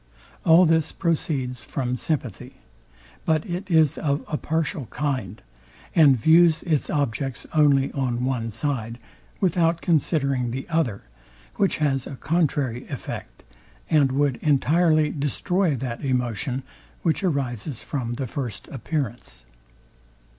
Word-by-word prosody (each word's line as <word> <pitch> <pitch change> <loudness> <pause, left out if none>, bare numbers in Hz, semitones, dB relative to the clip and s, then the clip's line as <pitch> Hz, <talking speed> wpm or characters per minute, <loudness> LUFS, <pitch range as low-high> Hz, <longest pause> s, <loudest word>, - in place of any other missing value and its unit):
All 170 +3 +7
this 160 -1 +2
proceeds 140 -8 -1
from 125 -2 -2
sympathy; 125 - -3 0.7
but 155 -1 +1
it 180 +3 -5
is 160 -4 +3
of 140 -1 -1
a 155 - -2
partial 155 -4 -2
kind, 130 -8 -3 0.5
and 145 -6 +6
views 160 +5 +5
its 155 -5 0
objects 135 -2 -2
only 145 -3 +4
on 125 -3 -1
one 125 -3 -1
side, 115 -1 -3 0.4
without 170 -2 +2
considering 140 -7 +1
the 130 +3 -5
other, 155 -12 0 0.5
which 200 -2 +2
has 135 -4 0
a 135 - -7
contrary 140 -6 -1
effect, 135 -5 -7 0.5
and 145 -4 +4
would 140 -1 +1
entirely 155 +1 +3
destroy 155 +4 0
that 125 -1 -5
emotion, 130 0 -1 0.4
which 165 +3 +1
arises 130 - -2
from 120 -4 -3
the 135 - -3
first 125 -2 -5
appearance. 135 -3 -4
140 Hz, 120 wpm, -24 LUFS, 125-160 Hz, 0.7 s, All